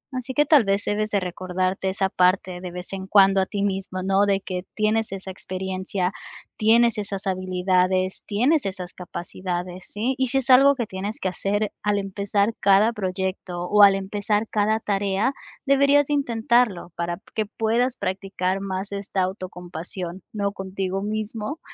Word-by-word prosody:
Así 255 Hz, +1 st, -4 dB
que 295 Hz, 0 st, +4 dB
tal 295 Hz, -6 st, +6 dB
vez, 195 Hz, 0 st, 0 dB
debes 215 Hz, +1 st, 0 dB
de 205 Hz, -, +1 dB
recordarte 185 Hz, +1 st, -2 dB
esa 195 Hz, 0 st, 0 dB
parte 185 Hz, -1 st, +1 dB
de 180 Hz, -, -5 dB
vez 180 Hz, +2 st, -7 dB
en 190 Hz, 0 st, -5 dB
cuando 195 Hz, -1 st, +5 dB
a 190 Hz, -, +1 dB
ti 200 Hz, -1 st, -2 dB
mismo, 190 Hz, -2 st, -2 dB
¿no?, 195 Hz, +1 st, +3 dB
de 195 Hz, -1 st, +2 dB
que 180 Hz, -1 st, -4 dB
tienes 215 Hz, 0 st, +1 dB
esa 190 Hz, -1 st, -6 dB
experiencia, 185 Hz, 0 st, -3 dB, 0.4 s
tienes 225 Hz, 0 st, +4 dB
esas 200 Hz, -1 st, -5 dB
habilidades, 185 Hz, 0 st, +1 dB
tienes 255 Hz, +8 st, +2 dB
esas 185 Hz, -2 st, -6 dB
capacidades, 180 Hz, 0 st, -5 dB
¿sí?, 230 Hz, +6 st, -1 dB
y 260 Hz, -, +2 dB
sí 260 Hz, +3 st, 0 dB
es 260 Hz, -1 st, +1 dB
algo 275 Hz, +2 st, +7 dB
que 240 Hz, -4 st, -2 dB
tienes 200 Hz, +2 st, -5 dB
que 190 Hz, -, -1 dB
hacer 205 Hz, +3 st, -1 dB
al 210 Hz, -1 st, +1 dB
empezar 200 Hz, +2 st, 0 dB
cada 205 Hz, +3 st, +4 dB
proyecto, 185 Hz, -2 st, -3 dB
o 205 Hz, +3 st, +3 dB
al 200 Hz, -1 st, +8 dB
empezar 205 Hz, +2 st, -1 dB
cada 215 Hz, +1 st, +2 dB
tarea, 200 Hz, +4 st, 0 dB, 0.3 s
deberías 280 Hz, +1 st, +4 dB
de 295 Hz, -, -1 dB
intentarlo 235 Hz, -8 st, +1 dB
para 170 Hz, 0 st, -2 dB, 0.2 s
que 215 Hz, -2 st, -1 dB
puedas 235 Hz, +4 st, 0 dB
practicar 190 Hz, 0 st, -2 dB
más 195 Hz, +1 st, -4 dB
esta 200 Hz, -1 st, -2 dB
autocompasión, 180 Hz, -1 st, -6 dB
¿no?, 200 Hz, -2 st, -1 dB
contigo 190 Hz, 0 st, -3 dB
mismo, 215 Hz, +6 st, -4 dB
195 Hz, 165 wpm, -24 LUFS, 185-215 Hz, 0.4 s, al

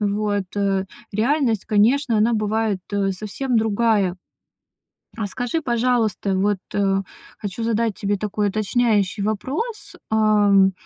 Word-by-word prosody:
Вот, 205 Hz, -1 st, 0 dB
э. 195 Hz, -1 st, +1 dB, 0.3 s
Реальность, 235 Hz, 0 st, +1 dB
конечно, 230 Hz, +3 st, +3 dB
она 225 Hz, +2 st, +3 dB
бывает, 215 Hz, -2 st, 0 dB
э, 195 Hz, -1 st, +1 dB
совсем 220 Hz, +6 st, -2 dB
другая. 215 Hz, -4 st, +2 dB, 1.0 s
А 215 Hz, -3 st, -2 dB
скажи, 245 Hz, +9 st, -2 dB
пожалуйста, 235 Hz, -, 0 dB
вот, 205 Hz, +1 st, +1 dB, 0.8 s
хочу 205 Hz, +2 st, -5 dB
задать 230 Hz, -1 st, 0 dB
тебе 205 Hz, 0 st, -1 dB
такой 210 Hz, +1 st, -1 dB
уточняющий 210 Hz, -1 st, +1 dB
вопрос, 280 Hz, -, -3 dB
ам, 205 Hz, -3 st, +4 dB
215 Hz, 110 wpm, -22 LUFS, 200-230 Hz, 1.0 s, ам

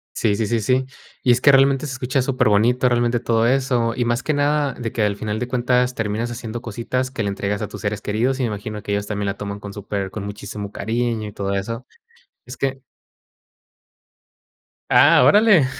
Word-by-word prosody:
Sí 105 Hz, -2 st, +1 dB
sí 110 Hz, 0 st, -1 dB
sí 115 Hz, 0 st, 0 dB
sí. 130 Hz, +4 st, +1 dB, 0.4 s
Y 125 Hz, -, +3 dB
es 120 Hz, +1 st, +3 dB
que 145 Hz, -, +7 dB
realmente 135 Hz, +1 st, +4 dB
se 135 Hz, -, -4 dB
escucha 130 Hz, +1 st, -1 dB
superbonito, 125 Hz, -1 st, +2 dB
realmente 120 Hz, 0 st, +1 dB
todo 115 Hz, 0 st, +1 dB
eso, 125 Hz, -2 st, +1 dB
y 125 Hz, -, 0 dB
más 120 Hz, +1 st, 0 dB
que 155 Hz, -, 0 dB
nada 145 Hz, 0 st, +1 dB
de 115 Hz, -2 st, -5 dB
que 110 Hz, -, 0 dB
al 105 Hz, -1 st, +1 dB
final 105 Hz, +1 st, -3 dB
de 125 Hz, -, -3 dB
cuentas 125 Hz, 0 st, +1 dB
terminas 110 Hz, +1 st, -2 dB
haciendo 120 Hz, -1 st, -6 dB
cositas 125 Hz, +3 st, -3 dB
que 130 Hz, -, -4 dB
le 100 Hz, -, 0 dB
entregas 100 Hz, +1 st, -2 dB
a 105 Hz, -, -2 dB
tus 105 Hz, -, -9 dB
seres 105 Hz, 0 st, -2 dB
queridos 120 Hz, +7 st, 0 dB
y -, -, 0 dB
me -, -, +1 dB
imagino 105 Hz, 0 st, -5 dB
que 100 Hz, -, -3 dB
ellos 100 Hz, 0 st, -1 dB
también 105 Hz, -1 st, -2 dB
la 100 Hz, -, -3 dB
toman 100 Hz, 0 st, -5 dB
con 100 Hz, -1 st, -8 dB
super 100 Hz, -1 st, -4 dB
con 100 Hz, 0 st, -6 dB
muchísimo 100 Hz, 0 st, -6 dB
cariño 115 Hz, 0 st, -2 dB
y 105 Hz, -, -9 dB
todo 100 Hz, 0 st, -3 dB
eso. 115 Hz, +5 st, -3 dB, 0.6 s
Es -, -, -8 dB
que 135 Hz, 0 st, -2 dB, 2.1 s
Ah, -, -, +6 dB
órale 205 Hz, -8 st, +6 dB
115 Hz, 205 wpm, -21 LUFS, 105-130 Hz, 2.1 s, que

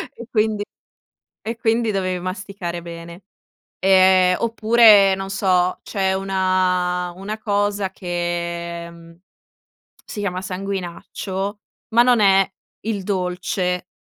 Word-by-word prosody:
e 235 Hz, -, -10 dB
quindi 215 Hz, -2 st, +1 dB, 0.8 s
e 225 Hz, +1 st, -4 dB
quindi 230 Hz, 0 st, +1 dB
dovevi 185 Hz, -2 st, -1 dB
masticare 185 Hz, -1 st, -5 dB
bene. 170 Hz, +1 st, -10 dB, 0.6 s
Ehm, 185 Hz, -1 st, +5 dB
oppure, 220 Hz, -3 st, +5 dB
non 195 Hz, 0 st, -6 dB
so, 185 Hz, -2 st, +1 dB
c'è 190 Hz, -2 st, -1 dB
una 185 Hz, -2 st, 0 dB
una 205 Hz, +3 st, -5 dB
cosa 205 Hz, -2 st, -1 dB
che, 170 Hz, -1 st, -4 dB
mhmm, 170 Hz, 0 st, -16 dB, 0.9 s
si 215 Hz, -, -7 dB
chiama 185 Hz, -3 st, -2 dB
sanguinaccio, 190 Hz, +1 st, -5 dB, 0.3 s
ma 235 Hz, -, +6 dB
non 245 Hz, -1 st, +4 dB
è 195 Hz, -1 st, +4 dB, 0.3 s
il 210 Hz, -3 st, -3 dB
dolce, 180 Hz, -1 st, -2 dB
190 Hz, 105 wpm, -21 LUFS, 180-205 Hz, 0.9 s, ma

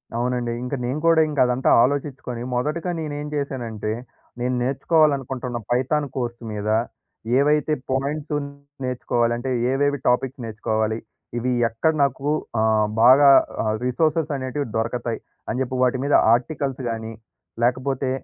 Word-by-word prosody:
అవునండి. 120 Hz, 0 st, -1 dB
ఇంక 125 Hz, +3 st, -5 dB
నేను 130 Hz, +5 st, -2 dB
కూడా, 165 Hz, -1 st, +6 dB
ఇంక 150 Hz, -, -3 dB
అదంతా 125 Hz, +1 st, +1 dB
ఆలోచించుకొని 130 Hz, -3 st, -2 dB
మొదటగా 155 Hz, +8 st, -1 dB
నేనేం 150 Hz, -1 st, -4 dB
చేశానంటే, 120 Hz, -7 st, -3 dB, 0.5 s
నేను 125 Hz, +1 st, 0 dB
నేర్చుకోవాలనుకుంటున్న 135 Hz, -3 st, +1 dB
పైథాన్ 140 Hz, +4 st, +1 dB
కోర్స్ 120 Hz, -2 st, -3 dB
మీద, 105 Hz, 0 st, -3 dB, 0.7 s
ఏవైతే 150 Hz, +2 st, +2 dB, 0.2 s
పాయింట్సును 145 Hz, +2 st, -2 dB, 0.4 s
నేర్చుకోవాలంటే, 120 Hz, 0 st, -1 dB, 0.2 s
ఏవేవి 145 Hz, 0 st, +1 dB
టాపిక్స్ 130 Hz, +1 st, 0 dB
నేర్చుకోవాలి. 110 Hz, 0 st, -1 dB, 0.4 s
ఇవి 125 Hz, +2 st, 0 dB, 0.2 s
ఎక్కడ 160 Hz, +8 st, +1 dB
నాకు 140 Hz, +1 st, -1 dB, 0.3 s
ఆహ్, 110 Hz, -1 st, +3 dB
బాగా 140 Hz, +4 st, +8 dB, 0.3 s
ఆహ్, 110 Hz, -1 st, 0 dB
రిసోర్సెసనేటివి 145 Hz, -1 st, 0 dB
దొరకతాయి. 115 Hz, +1 st, -2 dB, 0.3 s
అని 125 Hz, -, -1 dB
చెప్పి 130 Hz, 0 st, -2 dB
వాటి 125 Hz, +1 st, +2 dB
మీద 140 Hz, +1 st, 0 dB, 0.2 s
ఆర్టికల్స్ 135 Hz, +1 st, -1 dB
గాని, 115 Hz, 0 st, -4 dB, 0.5 s
లేకపోతే 130 Hz, +2 st, 0 dB
130 Hz, 120 wpm, -23 LUFS, 120-145 Hz, 0.7 s, బాగా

